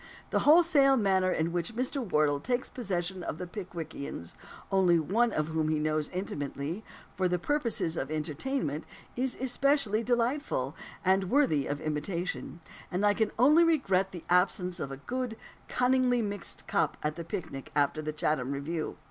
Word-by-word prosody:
The - - +3
wholesale 295 -4 +6
manner 190 -4 +3
in 160 0 0
which 175 +6 -2
Mr. 260 +3 -1
Wardle 150 -8 +2
takes 245 - -2
possession 185 -5 -2
of 165 - -4
the 180 - -4
Pickwickians 170 - -6 0.4
only 185 -3 +4
one 220 +9 +2
of 155 -4 -1
whom 160 -1 0
he 155 - +2
knows 155 0 0
intimately 160 0 -4 0.3
for 185 -2 +1
purposes 230 - -1
of 135 - -2
entertainment, 155 - -2 0.3
is 255 +1 -1
especially 265 -3 +2
delightful, 235 - 0 0.3
and 190 0 +3
worthy 255 - +3
of 145 0 -2
imitation; 170 +3 -3 0.3
and 185 +3 0
I 205 - +5
can 220 0 +1
only 295 +8 +6
regret 195 - +2
the 175 -3 -8
absence 180 0 +2
of 140 - -4
a 135 - -5
good, 245 - -4 0.3
cunningly 250 -1 +2
mixed 205 -4 -5
"cup" - - 0
at 150 0 -1
the 170 - -5
picnic 160 -5 -6
after 145 +1 +2
the 155 0 -3
Chatham 150 -3 0
review. 155 +3 -3
185 Hz, 155 wpm, -30 LUFS, 155-240 Hz, 0.4 s, wholesale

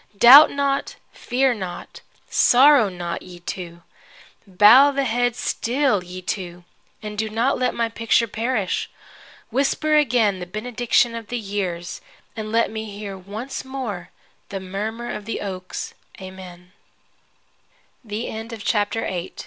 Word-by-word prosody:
Doubt 265 +8 +10
not, 280 -1 -1 0.2
fear 260 +1 0
not, 185 -5 -8 0.3
sorrow 260 -3 +5
not, 175 -2 -5
ye 180 -1 -12
two. 175 -1 -7 0.6
Bow 210 +9 +7
the 275 -1 -1
head 245 -1 0
still, 240 -5 0
ye 180 +1 -9
two, 180 -2 -5 0.4
and 210 0 -3
let 220 -1 -4
not 250 +2 0
my 230 -1 0
picture 230 0 +1
perish. 225 -3 -2 0.6
Whisper 280 +4 +1
again 235 -9 +2
the 180 - -7
benediction 235 +4 0
of 230 -2 -7
the 245 - -3
years, 195 -5 -4 0.3
and 215 -1 -5
let 230 0 +2
me 220 0 -5
hear 200 -1 -7
once 205 +8 -7
more 245 -10 -6 0.4
the 195 - -4
murmur 215 +5 -5
of 210 - -7
the 230 - -4
oak's 185 -2 -6
220 Hz, 115 wpm, -22 LUFS, 190-245 Hz, 0.6 s, Doubt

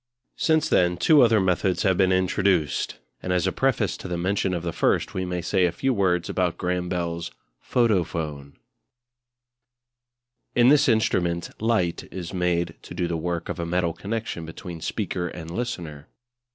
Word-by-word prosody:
Since 160 -1 +2
then 90 -1 +3
two 150 - +5
other 115 -3 +5
methods 95 0 +1
have 95 -3 +3
been 95 0 +3
introduced; 95 -4 +1 0.2
and 90 - -3
as 90 0 +2
a 95 - +1
preface 115 -7 +1
to - - -8
the 90 -1 -2
mention 95 +2 0
of 85 - -4
the 85 -2 -3
first - - +1
we 95 0 -2
may 90 -1 -3
say 90 +1 +2
a 85 - +1
few 135 +10 0
words 90 -5 +1
about 90 -2 0
Graham 90 0 -2
Bell's 85 -2 -2 0.3
Photophone. 80 - 0 2.0
In 120 0 +6
this 145 -1 +5
instrument 85 -6 +1
light 110 -7 0
is 90 -1 -6
made 85 -2 0
to - - -10
do 85 - -1
the 85 - -2
work 85 +1 -3
of - - -4
a 85 - -2
metal 85 -1 0
connection 105 -1 -4
between 80 +1 -8
speaker 90 +2 -2
and 85 -1 -8
listener. 85 - -5
90 Hz, 165 wpm, -25 LUFS, 85-100 Hz, 2.0 s, In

